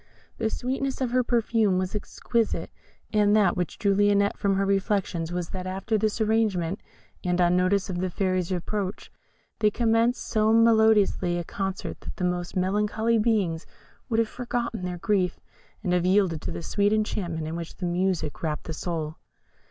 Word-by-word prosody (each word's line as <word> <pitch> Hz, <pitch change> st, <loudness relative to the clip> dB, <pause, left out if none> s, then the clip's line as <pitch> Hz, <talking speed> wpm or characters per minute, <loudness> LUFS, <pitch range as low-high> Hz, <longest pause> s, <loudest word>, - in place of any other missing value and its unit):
The 220 Hz, -1 st, +1 dB
sweetness 265 Hz, +3 st, -2 dB
of 255 Hz, -3 st, -1 dB
their 255 Hz, +1 st, +3 dB
perfume 225 Hz, -5 st, +2 dB
was 185 Hz, 0 st, -2 dB
exquisite; 225 Hz, +2 st, -2 dB, 0.4 s
and 210 Hz, -1 st, +4 dB
that 200 Hz, -5 st, +4 dB
which 180 Hz, -2 st, -3 dB
drew 200 Hz, -1 st, +2 dB
Lionette 200 Hz, 0 st, +3 dB
from 200 Hz, -2 st, +1 dB
her 195 Hz, +1 st, +1 dB
reflections 195 Hz, -4 st, 0 dB
was, 175 Hz, -1 st, -3 dB
that 185 Hz, -1 st, -5 dB
after 195 Hz, +4 st, -2 dB
this 215 Hz, +1 st, 0 dB
arrangement, 210 Hz, -5 st, +1 dB, 0.4 s
and 180 Hz, -1 st, 0 dB
on 175 Hz, 0 st, +4 dB
notice 185 Hz, +2 st, +2 dB
of 180 Hz, -3 st, -3 dB
the 185 Hz, 0 st, -1 dB
Fairy's 185 Hz, -1 st, -1 dB
approach, 190 Hz, +2 st, -3 dB, 0.5 s
they 215 Hz, -2 st, +4 dB
commenced 230 Hz, +2 st, +1 dB
so 215 Hz, 0 st, +2 dB
melodious 220 Hz, -2 st, +5 dB
a 175 Hz, -1 st, -1 dB
concert 195 Hz, +2 st, -4 dB
that -, -, -8 dB
the -, -, -5 dB
most 180 Hz, -1 st, -2 dB
melancholy 210 Hz, +4 st, +1 dB
beings 205 Hz, -8 st, 0 dB, 0.4 s
would 225 Hz, -, +1 dB
have 230 Hz, -1 st, +3 dB
forgotten 235 Hz, -4 st, -3 dB
their 180 Hz, -1 st, -3 dB
grief, 185 Hz, -1 st, 0 dB, 0.4 s
and 180 Hz, -3 st, 0 dB
have 180 Hz, -1 st, +2 dB
yielded 185 Hz, -5 st, +2 dB
to -, -, -4 dB
the -, -, -6 dB
sweet 205 Hz, +3 st, +1 dB
enchantment 180 Hz, -7 st, -1 dB
in 160 Hz, -, -4 dB
which 170 Hz, -1 st, -6 dB
this 180 Hz, -, -2 dB
music 175 Hz, -3 st, -1 dB
wrapped 155 Hz, -2 st, -2 dB
the 160 Hz, -, -5 dB
soul. 160 Hz, -2 st, -4 dB
195 Hz, 175 wpm, -26 LUFS, 180-220 Hz, 0.5 s, melodious